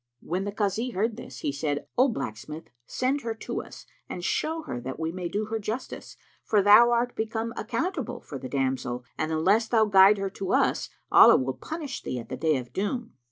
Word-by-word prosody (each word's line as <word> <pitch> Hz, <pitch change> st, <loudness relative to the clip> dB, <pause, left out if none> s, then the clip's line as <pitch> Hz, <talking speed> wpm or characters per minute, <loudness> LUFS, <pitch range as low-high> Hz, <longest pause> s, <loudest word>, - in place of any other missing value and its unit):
When 185 Hz, +3 st, -3 dB
the 205 Hz, -, -3 dB
Kazi 215 Hz, +4 st, -1 dB
heard 220 Hz, 0 st, -1 dB
this, 240 Hz, -, -10 dB
he -, -, -1 dB
said, 145 Hz, 0 st, -2 dB
"O 255 Hz, +2 st, +5 dB
blacksmith, 140 Hz, -, -5 dB, 0.2 s
send 265 Hz, +3 st, -1 dB
her 230 Hz, -2 st, -3 dB
to -, -, -4 dB
us -, -, -12 dB, 0.2 s
and 175 Hz, -, -6 dB
show 320 Hz, +1 st, -1 dB
her 120 Hz, -, -5 dB
that 130 Hz, +4 st, -6 dB
we 160 Hz, 0 st, -2 dB
may 180 Hz, 0 st, -4 dB
do 210 Hz, +4 st, -2 dB
her 225 Hz, +1 st, -3 dB
justice, 220 Hz, +5 st, -6 dB, 0.3 s
for 205 Hz, -2 st, +2 dB
thou 210 Hz, +4 st, +8 dB
art 240 Hz, +1 st, +1 dB
become 225 Hz, +1 st, -3 dB
accountable 275 Hz, -, -3 dB
for 140 Hz, -, -8 dB
the 130 Hz, -, -7 dB
damsel 130 Hz, -2 st, -2 dB
and 155 Hz, 0 st, -2 dB
unless 205 Hz, +8 st, +2 dB
thou 225 Hz, -1 st, +3 dB
guide 200 Hz, 0 st, +6 dB
her 195 Hz, -1 st, -3 dB
to 190 Hz, -1 st, -3 dB
us, -, -, +2 dB, 0.2 s
Allah -, -, +8 dB
will 130 Hz, 0 st, -1 dB
punish 290 Hz, -, -6 dB
thee 125 Hz, -, -4 dB
at 115 Hz, -, -7 dB
the -, -, -3 dB
Day 155 Hz, -3 st, +2 dB
of 125 Hz, -2 st, -8 dB
Doom." 230 Hz, +4 st, -3 dB
205 Hz, 205 wpm, -27 LUFS, 150-230 Hz, 0.3 s, thou